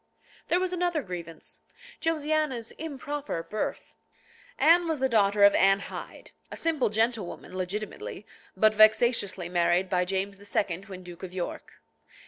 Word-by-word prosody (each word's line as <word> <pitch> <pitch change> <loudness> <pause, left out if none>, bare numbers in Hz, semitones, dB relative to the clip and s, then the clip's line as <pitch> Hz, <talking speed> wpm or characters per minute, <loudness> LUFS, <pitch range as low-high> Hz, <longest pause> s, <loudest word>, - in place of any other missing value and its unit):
There 350 - +2
was 370 0 -1
another 350 -4 0
grievance, 170 -4 -8 0.4
Josiana's 305 -7 0
"improper" 290 - -4
birth. 210 +5 -4 0.6
Anne 340 +2 +5
was 320 -2 0
the 265 0 +1
daughter 205 -4 +3
of 200 - +8
Anne 195 +1 +4
Hyde, - - -9 0.2
a - - -8
simple 320 -7 +1
gentlewoman, 220 -4 -2
legitimately, 195 +2 -5 0.3
but 215 +2 +5
vexatiously, 215 -4 +4
married 175 +1 +1
by 180 -1 +2
James 195 +1 -2
II. 200 -2 -2
when 185 -2 -9
Duke 175 0 -11
of 185 -1 -8
York. 180 - -5
210 Hz, 135 wpm, -28 LUFS, 185-285 Hz, 0.6 s, of